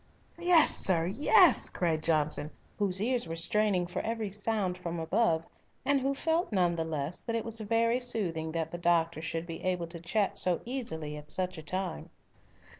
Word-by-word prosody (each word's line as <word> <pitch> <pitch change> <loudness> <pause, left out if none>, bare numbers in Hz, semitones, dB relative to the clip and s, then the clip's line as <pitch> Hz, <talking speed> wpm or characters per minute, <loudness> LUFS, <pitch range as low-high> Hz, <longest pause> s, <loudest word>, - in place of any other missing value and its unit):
"Yes, 345 -2 +5
sir, 170 -4 +3
yes!" 300 - +4
cried 165 -3 -1
Johnson, 150 -2 +1 0.3
whose 195 -2 +1
ears 240 -1 0
were 165 - -4
straining 190 +2 +1
for 175 - -4
every 225 -2 -3
sound 205 -2 -1
from 170 -2 -5
above, 165 0 +1 0.4
and 280 -1 +2
who 275 +1 0
felt 325 +2 0
none 180 -4 +2
the 165 - -1
less 155 +1 -4
that 230 - -3
it 225 - -2
was 225 0 -3
very 230 +3 +1
soothing 180 -10 0
that 160 -1 -2
the 175 - -6
doctor 170 -2 +1
should 165 0 -3
be 165 -1 -7
able 180 -2 -1
to 170 0 -9
chat 195 +5 -1
so 180 -2 +1
easily 160 - -4
at 150 0 -12
such 185 -2 -2
a - - -7
time. 185 +2 -4
180 Hz, 185 wpm, -30 LUFS, 165-225 Hz, 0.4 s, Yes